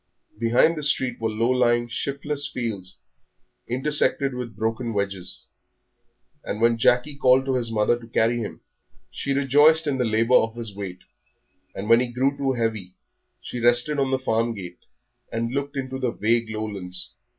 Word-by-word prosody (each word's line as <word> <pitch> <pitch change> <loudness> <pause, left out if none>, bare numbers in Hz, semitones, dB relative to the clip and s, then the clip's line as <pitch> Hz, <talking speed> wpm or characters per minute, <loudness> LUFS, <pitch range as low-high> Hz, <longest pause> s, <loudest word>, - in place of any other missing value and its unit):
Behind 120 +8 +3
the 155 - -4
street 130 -5 0
were 110 - 0
low 115 +3 0
lying, 120 -1 +2
shiftless 140 +4 -2
fields, 100 -7 -5 0.7
intersected 140 +1 +1
with 125 -3 -6
broken 115 +1 -2
hedges. 100 -3 -3 1.0
And 105 - -4
when 115 0 +3
Jackie 125 +5 +2
called 130 -1 +4
to 135 - 0
his 120 -3 -1
mother 110 +2 +1
to 115 - -13
carry 115 +1 +1
him, 110 - -6 0.5
she 140 - -4
rejoiced 145 +4 +4
in 140 -3 -1
the - - +2
labour 115 +2 +1
of 115 0 0
his 115 -4 -4
weight; 95 -3 -7 0.7
and 100 - -5
when 115 +1 +6
he 125 - 0
grew 130 +4 0
too 135 -1 0
heavy, 110 -6 -3 0.5
she 125 - -6
rested 120 +5 +3
on 135 -1 +1
the 130 - +1
farm 115 -2 0
gate, 90 -3 -10 0.5
and 115 +1 -2
looked 140 0 -3
into 130 0 -4
the 130 -2 0
vague 115 +1 0
lowlands. 100 -4 -5
120 Hz, 165 wpm, -24 LUFS, 110-135 Hz, 1.0 s, when